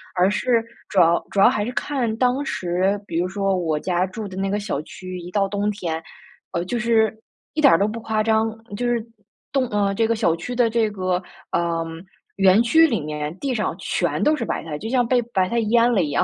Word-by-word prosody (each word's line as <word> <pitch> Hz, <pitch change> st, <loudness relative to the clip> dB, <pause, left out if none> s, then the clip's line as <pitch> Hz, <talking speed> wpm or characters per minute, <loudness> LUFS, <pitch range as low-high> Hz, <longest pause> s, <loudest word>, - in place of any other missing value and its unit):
而 185 Hz, +2 st, +3 dB
是 230 Hz, +3 st, +1 dB, 0.3 s
主 195 Hz, -, +2 dB
要 170 Hz, 0 st, +4 dB
主 200 Hz, -, -2 dB
要 195 Hz, -, +8 dB
还 210 Hz, -, +1 dB
是 235 Hz, -, -3 dB
看 250 Hz, -5 st, -1 dB
当 255 Hz, +3 st, +1 dB
时， 185 Hz, -3 st, 0 dB
比 165 Hz, -4 st, -2 dB
如 180 Hz, -, 0 dB
说 195 Hz, 0 st, 0 dB
我 160 Hz, -4 st, -1 dB
家 180 Hz, +2 st, 0 dB
住 205 Hz, +3 st, -6 dB
的 185 Hz, -, -9 dB
那 195 Hz, +1 st, -1 dB
个 205 Hz, +1 st, 0 dB
小 200 Hz, -8 st, -3 dB
区， 185 Hz, +3 st, -8 dB
一 175 Hz, 0 st, -8 dB
到 195 Hz, +1 st, +1 dB
冬 205 Hz, +1 st, -1 dB
天， 170 Hz, -6 st, -3 dB, 0.5 s
呃， 170 Hz, +1 st, -2 dB
就 240 Hz, +6 st, -2 dB
是 225 Hz, -2 st, +2 dB, 0.4 s
一 310 Hz, -, -1 dB
点 280 Hz, -, +7 dB
儿 -, -, +6 dB
都 200 Hz, -, +2 dB
不 220 Hz, +2 st, -4 dB
夸 220 Hz, -1 st, 0 dB
张， 220 Hz, 0 st, +2 dB, 0.3 s
就 245 Hz, -, -2 dB
是 235 Hz, -2 st, 0 dB, 0.5 s
冻 265 Hz, -2 st, +1 dB
呃， 200 Hz, -1 st, +1 dB
这 225 Hz, +3 st, +1 dB
个 230 Hz, -, +1 dB
小 190 Hz, -7 st, +2 dB
区 210 Hz, +9 st, -6 dB
的 240 Hz, -2 st, +3 dB
这 225 Hz, -1 st, +1 dB
个， 185 Hz, -2 st, -1 dB, 0.3 s
呃， 170 Hz, -1 st, 0 dB, 0.5 s
园 195 Hz, +2 st, +5 dB
区 320 Hz, +8 st, +5 dB
里 230 Hz, -8 st, 0 dB
面 150 Hz, +1 st, -4 dB
地 275 Hz, -2 st, -1 dB
上 215 Hz, -, -1 dB
全 -, -, -1 dB
都 305 Hz, -, +4 dB
是 245 Hz, -6 st, -3 dB
白 -, -, -3 dB
菜， 155 Hz, -2 st, -5 dB
就 220 Hz, -, -6 dB
像 245 Hz, -1 st, +2 dB
被 250 Hz, +1 st, +3 dB
白 195 Hz, -6 st, -1 dB
菜 235 Hz, -, +1 dB
淹 235 Hz, +1 st, +4 dB
了 210 Hz, -6 st, +3 dB
一 150 Hz, -, -2 dB
样。 -, -, +2 dB
205 Hz, 250 characters per minute, -22 LUFS, 180-235 Hz, 0.5 s, 要